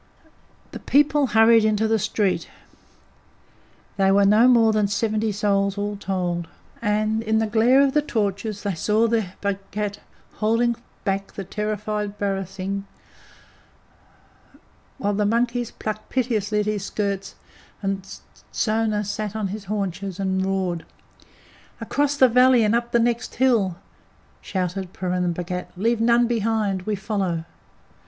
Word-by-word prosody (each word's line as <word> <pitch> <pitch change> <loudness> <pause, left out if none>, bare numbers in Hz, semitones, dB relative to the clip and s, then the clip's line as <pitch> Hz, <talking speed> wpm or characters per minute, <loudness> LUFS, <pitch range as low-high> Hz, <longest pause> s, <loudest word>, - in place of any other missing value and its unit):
The - - -7
people 290 0 +3
hurried 225 0 +5
into 215 0 +2
the 220 0 +2
street 190 -4 -1 1.5
they 195 -1 +3
were 200 +1 +4
no 215 +5 +6
more 230 -3 +5
than 210 -1 +2
seventy 215 +1 0
souls 200 -1 0
all 205 0 -2
told 180 -4 -2 0.3
and 215 0 +1
in 220 -1 +1
the 220 - +2
glare 230 +5 +4
of 275 -1 +2
the 300 - +3
torches 210 -5 -2
they 200 -2 -1
saw 210 +7 +2
their 220 -5 -1
Bhagat 200 +1 -3 0.4
holding 230 +2 +2 0.3
back 195 -1 -2
the 195 - -5
terrified 210 0 -3
barasingh, 195 0 -3 2.1
while 205 -7 -1
the 210 +1 0
monkeys 235 +2 0
plucked 215 0 -6
piteously 220 -5 0
at - - -3
his 210 -2 -2
skirts, 200 -1 -3 0.5
and 195 -1 -3 0.4
Sona 215 -1 0
sat 210 +1 -4
on 210 -3 -2
his 205 +1 -6
haunches 195 -1 -3
and 190 -1 0
roared. 190 -3 -1 1.0
"Across 290 0 0
the 260 - +7
valley 250 0 +5
and 210 +1 +2
up 235 0 0
the 235 - +4
next 235 0 0
hill!" 230 -8 +2 0.7
shouted 185 0 -3
Purun 180 -1 -1
Bhagat. 180 +1 -4
"Leave 225 +3 +1
none 235 +1 +4
behind! 220 -5 -1
We 215 - 0
follow!" 190 -5 -2
210 Hz, 135 wpm, -23 LUFS, 195-225 Hz, 2.1 s, the